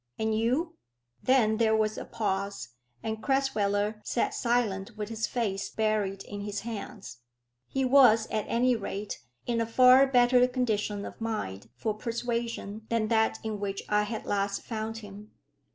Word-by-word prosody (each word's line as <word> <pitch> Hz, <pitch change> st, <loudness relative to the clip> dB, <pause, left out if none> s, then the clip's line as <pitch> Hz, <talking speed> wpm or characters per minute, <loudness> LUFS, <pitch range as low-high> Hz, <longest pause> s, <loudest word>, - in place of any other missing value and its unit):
"And 220 Hz, 0 st, 0 dB
you?" 270 Hz, +10 st, 0 dB, 0.4 s
Then 230 Hz, -5 st, +3 dB
there 220 Hz, -1 st, +3 dB
was 215 Hz, 0 st, +1 dB
a -, -, -6 dB
pause, 200 Hz, -, -3 dB, 0.3 s
and 220 Hz, 0 st, -3 dB
Crasweller 215 Hz, -6 st, 0 dB
sat 240 Hz, -, 0 dB
silent 225 Hz, -3 st, 0 dB
with 210 Hz, 0 st, -4 dB
his 225 Hz, 0 st, -2 dB
face 200 Hz, -5 st, -2 dB
buried 210 Hz, -3 st, -1 dB
in 205 Hz, 0 st, -7 dB
his 205 Hz, 0 st, -4 dB
hands. 215 Hz, -, -7 dB, 0.5 s
He 270 Hz, -1 st, -1 dB
was, 250 Hz, -4 st, +6 dB
at 215 Hz, -2 st, -1 dB
any 245 Hz, +1 st, +2 dB
rate, 205 Hz, -, -5 dB, 0.2 s
in 235 Hz, -1 st, 0 dB
a 225 Hz, -, -1 dB
far 255 Hz, +3 st, +7 dB
better 250 Hz, -1 st, +5 dB
condition 215 Hz, -5 st, -1 dB
of -, -, -10 dB
mind 115 Hz, -, -4 dB
for 215 Hz, -, -2 dB
persuasion 230 Hz, -1 st, -4 dB
than 225 Hz, -2 st, 0 dB
that 220 Hz, -1 st, +2 dB
in 215 Hz, -2 st, -3 dB
which 200 Hz, -1 st, -3 dB
I 210 Hz, 0 st, +3 dB
had 215 Hz, +1 st, -4 dB
last 200 Hz, 0 st, -1 dB
found 225 Hz, -1 st, -4 dB
him. 205 Hz, +1 st, -12 dB
220 Hz, 155 wpm, -29 LUFS, 205-235 Hz, 0.5 s, far